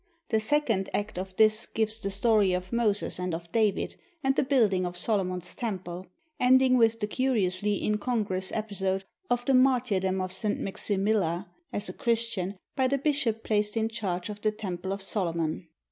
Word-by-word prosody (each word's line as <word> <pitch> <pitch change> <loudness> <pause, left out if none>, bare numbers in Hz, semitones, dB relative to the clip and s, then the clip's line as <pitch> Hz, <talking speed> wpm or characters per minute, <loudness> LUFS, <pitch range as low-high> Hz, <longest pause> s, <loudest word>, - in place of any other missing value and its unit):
The 220 - +3
second 220 -5 +1
act 205 -3 -2
of 190 0 -6
this 215 +1 +4
gives 220 0 -1
the 200 - -2
story 200 -1 +3
of 180 +2 -3
Moses 215 -5 0
and 180 -2 -1
of 170 0 -9
David 215 -3 +1 0.3
and 270 0 +2
the - - +3
Building 225 -9 +3
of 175 0 -3
Solomon's 185 -3 -1
Temple, 185 -5 -5 0.3
ending 255 0 +5
with 230 -2 +4
the 210 - 0
curiously 210 -5 0
incongruous 210 -3 -1
episode 195 -3 -1 0.3
of 245 0 +1
the 270 - +3
martyrdom 240 -8 +3
of 185 0 -2
St. 205 +2 -1
Maximilla, 195 -2 -1 0.2
as 205 - -2
a 180 - -4
Christian, 225 -5 0 0.2
by 260 -1 +2
the 275 +2 +1
bishop 275 -6 0
placed 210 0 0
in 225 0 +1
charge 195 -5 -3
of 210 0 -7
the 215 - +2
Temple 190 -3 -5
of 195 0 -3
Solomon. 170 -6 -2
210 Hz, 170 wpm, -28 LUFS, 185-230 Hz, 0.3 s, ending